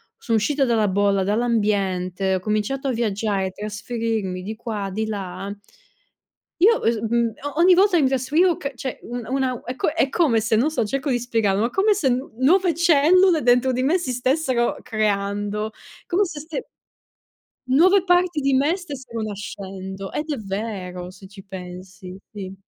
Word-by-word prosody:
sono 225 -2 0
uscita 275 +6 +1
dalla 225 -4 +2
bolla, 200 0 +2
dall'ambiente, 195 -4 0
ho - - -1
cominciato 215 +8 -2
a - - +1
viaggiare, 210 -4 -1
trasferirmi 210 -2 -3
di 215 +4 -5
qua, 215 -4 -4
di 220 +3 -2
là 195 -2 -5 1.1
io, 450 +6 +6
uhm, - - 0
s 230 - -3
mhmm, 235 +1 +1 0.3
ogni 360 +2 +6
volta 380 -1 +4
che - - +3
mi 265 - +3
trasferivo 305 +7 +2
c 280 -1 -5
cioè 260 +1 -5
un 240 -1 -6
una 260 -2 -1
è 250 - -5
co - - 0
è 300 -3 +1
come 280 -10 +2
se 220 +1 +1
non 270 +8 +2
so, 275 - 0
cerco 275 +5 -2
di 245 - +1
spiegarlo: 225 -4 0
ma 230 - +1
come 405 - +3
se 325 -10 +1
n 255 +3 -2
nuove 350 +6 +4
cellule, 340 +2 +4
dentro 245 +2 +4
di 255 +1 -1
me, 330 +7 +2
si 260 -7 -3
stessero 255 -1 0
creando, 205 0 -1 0.4
come 380 +3 +2
se 315 -5 -7
ste 310 +1 -6 1.0
Nuove 350 +9 +5
parti 355 -3 +2
di 275 0 +1
me 285 +6 +3
stessero 265 - -7
nascendo 195 -2 -6
ed 300 +1 -4
è 290 - -1
vero, 195 -3 -5
se 190 0 -14
ci 195 0 -13
pensi, 185 0 -9 0.2
sì. 195 -3 -7
235 Hz, 170 wpm, -22 LUFS, 200-285 Hz, 1.1 s, io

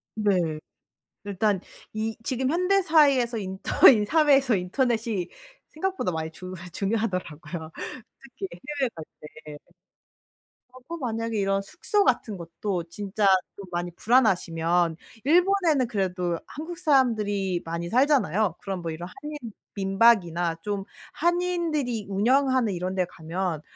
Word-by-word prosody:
네. 180 -7 +1 0.7
일단 200 -1 0 0.3
이 220 +1 -3
지금 260 +1 0
현대사회에서 310 -9 +3
인터 190 -2 +4
이 215 -5 +3
사회에서 275 -5 +4
인터넷이 220 0 -1 0.4
생각보다 345 - -2
많이 160 0 -3
중 185 +3 -9 0.2
중요하더라고요. 180 -6 -3 0.5
특히 245 -7 -8 0.3
해외 265 - +3
갈 160 - -8 0.4
때. 150 -1 -9 1.2
어 255 - -13
그 335 - -5
만약에 230 -5 -3
이런 195 -1 +1
숙소 405 - 0
같은 225 - +1
것도 175 +1 -4
진짜 205 +3 -2 0.3
좀 200 - -9
많이 175 0 -2
불안하시면 175 -8 +2 0.3
일본에는 340 -4 +3
그래도 180 -5 -1
한국 325 +4 -7
사람들이 215 - +2
많이 170 +1 -4
살잖아요. 225 - +2
그럼 195 -2 -4
뭐 165 -1 -3
이런 170 +3 -7
한인 300 0 -6 0.4
민박이나 195 -4 +3
좀 200 -2 -3 0.3
한인들이 335 - 0
운영하는 250 +2 +2
이런 180 +1 -3
데 185 -1 +1
가면 170 -1 -4
210 Hz, 280 characters per minute, -26 LUFS, 180-265 Hz, 1.2 s, 인터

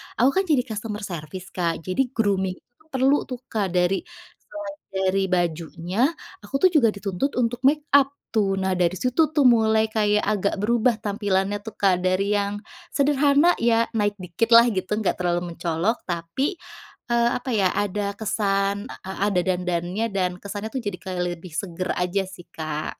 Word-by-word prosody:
aku 250 +4 +4
kan 385 - +3
jadi 285 -6 +3
customer 215 0 -4
service 175 +1 -6
Kak, 170 -3 -2
jadi 185 +9 +1
grooming 190 -4 +1
itu 245 +10 -28
perlu 265 +2 +2
tuh 250 -2 -5
Kak 210 -3 0
dari 180 +2 +2 0.5
selain 300 -1 -7
dari 190 0 0
bajunya 175 - 0 0.3
aku 205 +7 -8
tuh 370 - +8
juga 285 -9 +5
dituntut 200 +7 -2
untuk 245 0 0
makeup 290 -2 +4 0.2
tuh. 200 -3 +1
Nah 190 0 -1
dari 180 0 +1
situ 255 - +2
tuh 290 - +4
mulai 220 -3 +5
kayak 210 -1 +2
agak 205 -1 0
berubah 235 +1 +3
tampilannya 205 -1 0
tuh 220 -1 -8
Kak 195 -2 +3
dari 185 +2 +1
yang 200 0 0 0.4
sederhana, 285 +3 +4
ya 230 0 +3
naik 205 -2 0
dikit 185 +5 -2
lah 235 +1 +9
gitu, 185 -1 -3
nggak 210 - 0
terlalu 175 -1 -1
mencolok 170 +7 -1
tapi, 180 - -2 0.6
eee, 235 0 +3
apa 250 +1 -7
ya, 195 -3 +3
ada 205 0 -1
kesan, 200 -2 0
e 190 - -10 0.2
ada 190 -3 +2
dandannya 180 +3 -1
dan 185 -2 0
kesannya 205 +1 -5
tuh 260 - -1
jadi 205 -3 -3 0.4
lebih 170 0 -12
seger 185 0 -3
aja 180 +2 0
sih, 180 -2 -12
Kak. 155 -1 -4
205 Hz, 165 wpm, -24 LUFS, 185-235 Hz, 0.6 s, lah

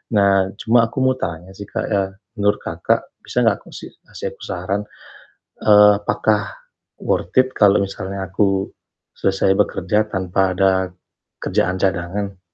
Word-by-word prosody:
Nah 100 -1 +4
cuma 115 0 +4
aku 115 - -16
mau 130 0 +3
tanya 85 +1 -5
sih, 100 - -7
Kak, - - -3
ya 100 -2 +2 0.3
menurut 105 0 +1
Kakak, 85 0 0 0.2
bisa - - -1
gak - - +3
aku - - -18
sih - - -8 0.2
kasih - - -6
aku - - -18
saran, 95 +3 -2 0.8
eee, 105 -1 +7
apakah 105 0 +1 0.6
worth 90 +4 -1
it 130 0 +3
kalau 100 -1 +5
misalnya 95 0 -5
aku 95 0 0 0.5
selesai 95 0 +2
bekerja 105 +2 +1
tanpa 95 -1 0
ada 95 +1 +4 0.7
kerjaan 90 - 0
cadangan? 95 +2 -2
100 Hz, 145 wpm, -20 LUFS, 95-105 Hz, 0.8 s, eee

